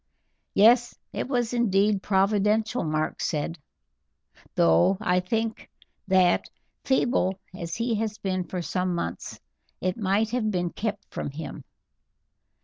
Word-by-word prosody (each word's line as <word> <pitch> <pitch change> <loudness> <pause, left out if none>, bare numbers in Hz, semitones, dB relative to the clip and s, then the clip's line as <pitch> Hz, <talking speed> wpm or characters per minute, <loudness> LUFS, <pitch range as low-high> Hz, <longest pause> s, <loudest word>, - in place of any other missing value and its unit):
"Yes, 240 +4 +5 0.2
it - - -3
was 245 -3 0
indeed 205 -3 +2
providential," 210 +4 +2
Mark 155 0 -1
said, 160 +1 -2 1.0
"though 85 - +4
I 180 -4 +2
think 225 +4 -2 0.4
that, 185 -2 +3 0.3
feeble 240 -8 +1 0.2
as 170 -2 -5
he 230 +1 -1
has 215 -1 -2
been 185 -4 -2
for 180 -1 -4
some 180 +1 -1
months, 85 - -4 0.4
it 185 0 -1
might 210 +1 +1
have 240 -3 0
been 175 -3 -1
kept 210 -2 -4
from - - -4
him. 150 +3 -7
195 Hz, 125 wpm, -26 LUFS, 180-220 Hz, 1.0 s, Yes